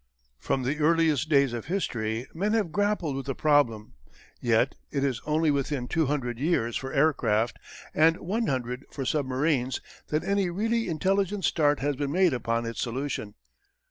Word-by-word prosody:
From 130 - -1
the 140 +5 -1
earliest 160 -2 +2
days 140 -4 +4
of 120 - -4
history 115 - -2
men 200 +6 0
have 210 -7 +1
grappled 205 -7 0
with 135 0 -5
the 135 - -2
problem, 135 -8 +2 0.5
yet 120 +2 +2 0.2
it 140 -2 -1
is 130 -5 -1
only 155 0 +2
within 140 -2 -1
two 160 +1 +1
hundred 125 -5 -2
years 130 -7 0
for 135 0 -3
aircraft 120 -6 +1 0.3
and 165 +2 +4
one 215 +6 -2
hundred 125 0 -2
for 135 - -5
submarines 130 -2 0 0.3
that 155 +1 -1
any 200 -2 +1
really 225 +4 0
intelligent 195 +4 0
start 145 -4 +2
has 145 +1 0
been 140 +1 -2
made 180 -1 +3
upon 115 -1 -1
its 115 0 -4
solution. 120 -4 -3
145 Hz, 165 wpm, -27 LUFS, 125-165 Hz, 0.5 s, days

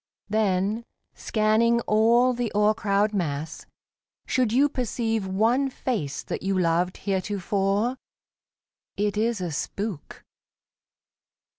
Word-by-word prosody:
Then, 210 +1 +1 0.3
scanning 225 +2 +2
all 235 +4 +3
the 240 -2 -2
o'ercrowded 210 0 +2
mass, 160 -4 -3 0.6
should 250 -4 +1
you 270 +5 +4
Perceive 225 -5 -2
one 230 +8 +2
face 210 - -3
that - - -5
you 195 0 0
loved 175 +1 +1
heretofore, 200 +4 -1 1.0
It 205 0 0
is 220 -1 0
a 175 -2 -3
spook. 195 +2 -5
210 Hz, 100 wpm, -25 LUFS, 190-235 Hz, 1.0 s, you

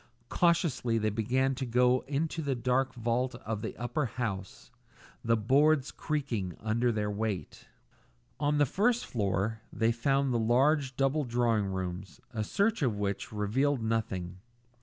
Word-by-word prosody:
Cautiously 170 -9 +2
they 110 -1 0
began 130 +5 +1
to 130 +1 -4
go 125 +1 +3
up - - -18
into 155 +3 -1
the 140 -3 -1
dark 130 +2 0
vault 120 +2 -1
of 110 -1 -3
the - - -5
upper 120 +3 -1
house, 105 -6 -5 0.5
the 115 0 +3
boards 140 +6 +3
creaking 120 - -3
under 115 +3 +1
their 105 -2 -1
weight. 100 -6 -4 0.7
On 145 0 +1
the 145 - +5
first 230 - +1
floor 105 0 -1
they 115 0 +1
found 135 +3 +1
the 120 - +1
large 130 +4 +2
double 140 +3 +2
drawing 120 -4 +1
rooms, 95 0 -5
a 110 -2 -1
search 205 - +1
of 120 -7 +1
which 100 -1 -3
revealed 115 +5 0
nothing. 95 -5 -2
120 Hz, 150 wpm, -30 LUFS, 110-135 Hz, 0.7 s, the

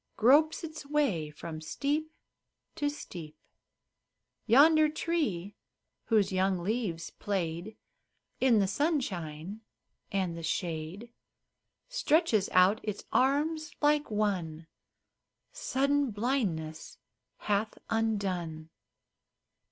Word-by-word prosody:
Gropes 295 +9 +4
its 315 -1 -6
way 275 - +1
from 155 +1 -8
steep 295 - -2 0.6
to 295 -3 -1
steep. 170 - -8 1.1
Yonder 305 +6 +6
tree, 285 - -2 0.5
whose 215 -4 +2
young 190 0 +2
leaves 180 -3 -2
played 185 +1 -3 0.6
In 255 -3 +4
the 200 - +4
sunshine 195 - -2 0.5
and 185 -4 -1
the 170 - -6
shade, 170 +6 -3 0.8
Stretches 315 - +2
out 185 +4 +5
its 210 -2 -5
arms 305 +4 +1
like 295 0 +2
one 185 -7 -1 0.9
Sudden 285 - +1
blindness 205 - -2 0.4
hath 210 +1 -1
undone. 185 -8 -1
210 Hz, 90 wpm, -30 LUFS, 175-285 Hz, 1.1 s, Yonder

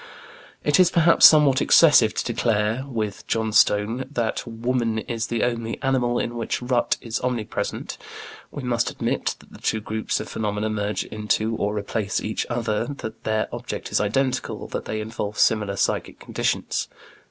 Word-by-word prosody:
If - - -10
it 145 +2 +4
is, 180 -1 +6
perhaps, 170 -1 +7
somewhat 150 -4 +5
excessive 125 -10 +6
to - - -2
declare, 110 +3 0
with 110 -6 -4
Johnstone, 110 +2 +2
that 120 -3 -2
"woman 115 0 -1
is 115 +1 -3
the 115 -2 -1
only 115 -2 -2
animal 125 -3 +1
in 120 - -2
which 115 - -2
rut 125 -1 +1
is 115 -1 -3
omnipresent," 125 -4 -3 0.5
we 145 - -7
must 120 -2 0
admit - - -2
that - - -20
the - - -13
two 110 - 0
groups 110 +1 -2
of - - -6
phenomena 105 0 -2
merge 105 0 -2
into 110 +1 -1
or 105 0 -1
replace 105 0 -2
each 110 - -3
other, 115 -2 -1
that 115 -6 -7
their 110 0 0
object - - -5
is - - +2
identical, 130 +5 -1
that - - -4
they 110 0 -3
involve 105 -1 -5
similar 105 -2 +2
psychic - - -1
conditions. - - -2
115 Hz, 165 wpm, -23 LUFS, 110-125 Hz, 0.5 s, perhaps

